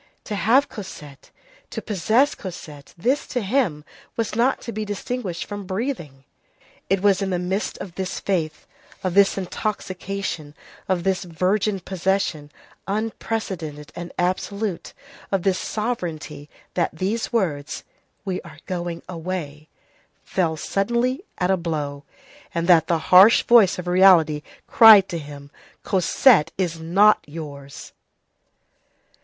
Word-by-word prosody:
To 215 - -6
have 240 +8 +3
Cosette, 150 - -10 0.4
to - - -5
possess 220 - +2
Cosette, 150 -6 -10
this, 255 +11 0
to 245 - -2
him, 195 - 0 0.3
was 230 -2 -1
not 245 +4 +2
to 235 - -6
be 215 -1 -3
distinguished 205 -2 -4
from 205 -2 -7
breathing. 185 - -4 0.7
It 195 0 +1
was 200 -1 +4
in 195 - -1
the 180 - 0
midst 185 +4 -2
of 185 -3 -8
this 190 0 -4
faith, 165 -6 -2 0.4
of 185 -2 -1
this 200 +1 +4
intoxication, 190 -5 -4 0.3
of 180 -2 +1
this 190 0 0
virgin 190 +4 0
possession, 185 -5 -1 0.4
unprecedented 195 -8 -4
and 175 0 -7
absolute, 185 +2 -2 0.4
of 195 -3 0
this 190 -2 +1
sovereignty, 170 -10 -4 0.2
that 175 - +1
these 205 +6 -2
words: 160 -11 -2 0.4
"We 185 -2 -2
are - - -13
going 175 -2 -4
away," 165 -4 -6 0.5
fell 165 -4 -1
suddenly, 240 - -1
at 180 +1 +1
a 190 - +3
blow, 145 -4 -4 0.5
and 170 0 0
that 170 -4 +5
the 170 - +2 0.2
harsh 195 +5 +8
voice 225 -6 +5
of 180 - -5
reality 175 -5 +5 0.2
cried 215 -4 +8
to 170 - -3
him: 145 -1 -10 0.3
"Cosette 190 - +4
is 170 -4 -2
not 195 +6 +4
yours!" 145 -3 -9
185 Hz, 130 wpm, -23 LUFS, 165-205 Hz, 0.7 s, harsh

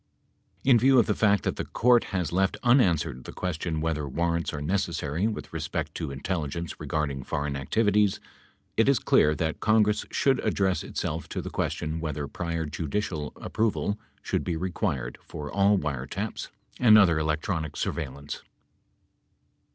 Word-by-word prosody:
In 125 -3 +6
view 130 +3 +5
of 120 - +6
the 105 - +1
fact 105 -1 +3
that - - -1
the - - -2
Court 120 0 +3
has 90 -3 -2
left 95 +1 +2
unanswered 85 - +3
the - - -7
question 85 -2 -3
whether 75 -3 -1
warrants 85 +3 0
are 75 - -4
necessary 85 +1 -1
with 110 - -5
respect 80 -1 -3
to 80 -4 -4
intelligence 80 +3 -4
regarding 70 -3 -2
foreign 70 +1 -2
activities, 105 - +2 0.6
it 115 +4 +4
is 140 - +5
clear 75 -6 +3
that 80 -1 -2
Congress 105 -1 +3
should 135 -2 +2
address 95 -2 +1
itself 80 0 -4
to - - -3
the - - -5
question 80 +1 -2
whether 75 -3 -3
prior 85 +1 -3
judicial 75 +1 -3
approval 110 -1 -1 0.2
should - - -1
be 85 -2 -2
required 85 - -2
for 75 -1 -7
all 100 +1 +4
wiretaps 75 - -3 0.3
and 110 -3 +7
other 85 -7 +5
electronic 80 +1 -2
surveillance. 70 -2 -4
85 Hz, 150 wpm, -27 LUFS, 75-105 Hz, 0.6 s, and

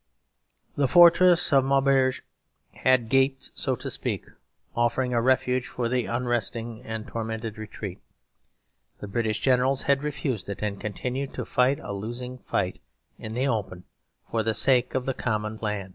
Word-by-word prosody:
The 140 -1 +2
fortress 175 +3 +6
of 135 -1 +6
Maubeuge 135 -1 +2 0.5
had 130 -3 +2
gaped, 135 +2 +1
so - - -1
to - - -5
speak, - - -2 0.5
offering 120 +2 +1
a 120 - +2
refuge 130 0 +1
for 120 - -3
the 125 0 0
unresting 120 -1 -2
and 110 -1 -5
tormented 110 -1 -5
retreat; 100 -3 -7 1.0
the 105 - -7
British 110 0 -1
Generals 130 +1 +2
had 140 -1 +2
refused 140 -8 -3
it 100 - -5
and 100 -2 -3
continued 125 +6 -4
to - - -4
fight 130 +2 +2
a 100 - -5
losing 120 +5 -6
fight 95 -6 -2 0.4
in 110 0 -7
the 130 +3 +1
open 100 -7 -2 0.5
for 115 - +1
the 110 0 0
sake 125 +2 +3
of 130 -1 -1
the 135 - -1
common 110 -3 -2
plan. 105 -3 -3
120 Hz, 155 wpm, -26 LUFS, 110-130 Hz, 1.0 s, fortress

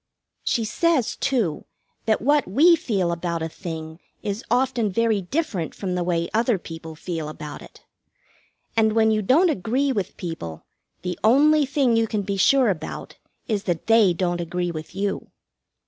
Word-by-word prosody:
She 230 -3 0
says, 315 +1 +1
too, 225 - -1 0.4
that 220 -1 +2
what 290 +2 +3
we 315 - +6
feel 200 - -1
about 170 -1 -2
a - - -1
thing 160 -2 -7 0.2
is 205 -1 -2
very 245 +2 +4 0.3
often 215 -1 +1
different 230 - -2
from 190 -3 -3
the 180 -1 0
way 170 -1 0
other 230 0 +2
people 160 -2 -9
feel 160 -2 -4
about 150 -1 -8
it. - - -15 0.9
And 220 -1 +3
when 220 0 +4
you 215 0 +1
don't 310 - +4
agree 260 +5 0
with 200 -8 -3
people, 160 - -6 0.4
the 180 -1 -3
only 290 +6 +5
thing 265 -4 +2
you 225 0 +2
can 210 -1 -2
be 200 +1 -2
sure 255 +3 +4
about 160 -4 -6 0.3
is 210 -3 -1
that 175 -3 -2
they 225 -4 +5
don't 175 0 -1
agree 175 +1 -2
with 155 +1 -8
you. 200 0 -2
200 Hz, 165 wpm, -23 LUFS, 170-240 Hz, 0.9 s, we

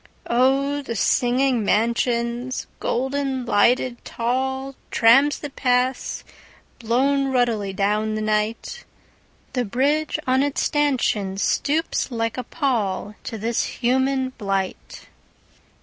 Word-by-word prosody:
Oh, 270 +4 +2
the 235 -4 -5
singing 245 +2 +2
mansions, 235 +3 0
Golden 265 0 -1
lighted 240 +3 +2
tallTrams 265 +1 +1
that 290 -2 -7
pass, 250 0 0 0.6
blown 270 +4 +1
ruddily 235 -6 0
down 210 +3 0
the 215 - -2
night! 215 - -2 0.7
The 250 - 0
bridge 285 +9 0
on 260 +1 +2
its 285 0 0
stanchionsStoops 280 - 0
like 230 -1 -2
a - - -3
pallTo 225 - -2
this 230 +2 0
human 260 +1 0
blight. 195 -2 -3
250 Hz, 95 wpm, -22 LUFS, 225-270 Hz, 0.7 s, Oh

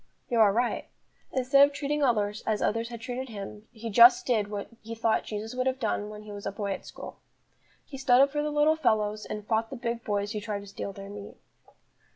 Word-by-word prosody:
You 235 - +2
are 210 -2 +7
right; 240 +4 -1 0.4
instead 265 +2 +5
of 285 0 +4
treating 295 +1 -1
others 215 -5 +1
as 215 -2 +1
others 230 +2 0
had 235 -2 -8
treated 255 +2 -5
him, 210 0 -8
he 230 -1 -7
just 240 +3 +7
did 220 -5 +1
what 205 -1 -4
he 225 +1 -7
thought 225 -1 +1
Jesus 215 +2 -5
would 255 +1 -1
have 260 0 0
done 210 -3 -1
when 210 0 -9
he 210 - -10
was 205 0 -6
a - - -2
boy 200 0 -3
at - - -5
school. - - -9 0.7
He 270 - -9
stood 250 -2 +5
up 275 +1 +5
for 295 +1 -1
the 300 - -1
little 300 +1 +3
fellows, 215 -7 0
and 210 -1 -5
fought 225 0 0
the 275 - -6
big 235 -1 -3
boys 205 0 -1
who 210 -2 -3
tried 205 -1 -4
to - - -11
steal 200 0 -6
their 195 0 -9
meat. 205 0 -9
225 Hz, 230 wpm, -28 LUFS, 210-255 Hz, 0.7 s, are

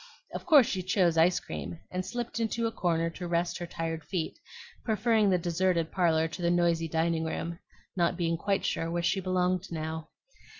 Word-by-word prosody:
Of - - -6
course 295 -7 +8
she 190 - -2
chose 185 -2 +2
ice 170 +1 +4
cream, 80 - -6
and 185 0 -2
slipped 240 +4 -4
into 230 +1 0
a 225 - 0
corner 165 -5 0
to 175 +1 -6
rest 170 0 0
her 175 - -4
tired 165 -1 -4
feet, 180 - -3 0.4
preferring 220 -1 +2
the 185 - +4
deserted 170 -1 0
parlor 165 -3 +2
to 170 +2 -8
the 170 - +2
noisy 170 -1 +2
dining 160 0 0
room, 165 +1 -3 0.4
not 170 -2 +1
being 170 -2 +1
quite 195 +4 0
sure 165 - -1
where 170 0 -1
she 190 - +2
belonged 185 0 0
now. 160 0 -4
175 Hz, 185 wpm, -29 LUFS, 165-190 Hz, 0.4 s, course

